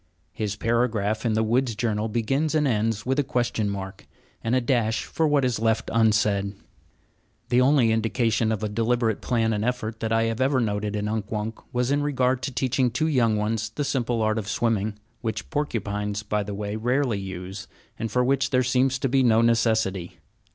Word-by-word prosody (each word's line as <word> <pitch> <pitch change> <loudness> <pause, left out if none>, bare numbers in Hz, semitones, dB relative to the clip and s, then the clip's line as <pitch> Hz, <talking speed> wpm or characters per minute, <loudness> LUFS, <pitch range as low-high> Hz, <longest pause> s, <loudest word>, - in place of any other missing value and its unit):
His 105 -1 -3
paragraph 110 -1 0
in 110 - +1
the 110 +1 +2
woods' 120 +1 +1
journal 110 -1 -1
begins 135 +8 0
and 150 -2 +3
ends 110 -2 0
with 130 +3 +1
a - - +3
question 120 -6 -1
mark, 95 -1 -6 0.4
and 115 +2 +1
a - - +4
dash 120 -3 0
for 160 - 0
what 145 -3 +3
is 125 -4 0
left 115 0 0
unsaid. 105 -3 +2 0.9
The 125 +1 +4
only 130 -3 +4
indication 110 0 +1
of 110 -1 -2
deliberate 115 -1 +1
plan 115 -2 +1
and 105 0 -1
effort 115 -2 -2
that 110 0 -2
I 115 0 +3
have 115 +1 -1
ever 130 0 +3
noted 105 -2 -1
in 105 0 -2
Unk 105 -1 -3
Wunk 110 +1 -3
was 125 +1 0
in 145 +1 +2
regard 130 -3 +1
to 135 - -3
teaching 130 0 +1
two 125 +6 -1
young 120 -8 +2
ones 105 0 -1
the 145 +7 -3
simple 120 -5 0
art 110 +1 +1
of 100 - -6
swimming, 110 -2 0 0.2
which 110 +1 -4
porcupines, 105 -8 -2
by 105 0 -1
the 100 0 -5
way, 105 0 -4
rarely 120 0 0
use, 95 +1 -7 0.3
and 115 -1 -3
for 125 +2 +2
which 135 +1 +1
there 130 -1 +2
seems 130 +1 +2
to 135 - -1
be 135 +1 +2
no 115 -3 +4
necessity. 110 -6 +1
115 Hz, 195 wpm, -25 LUFS, 105-125 Hz, 0.9 s, a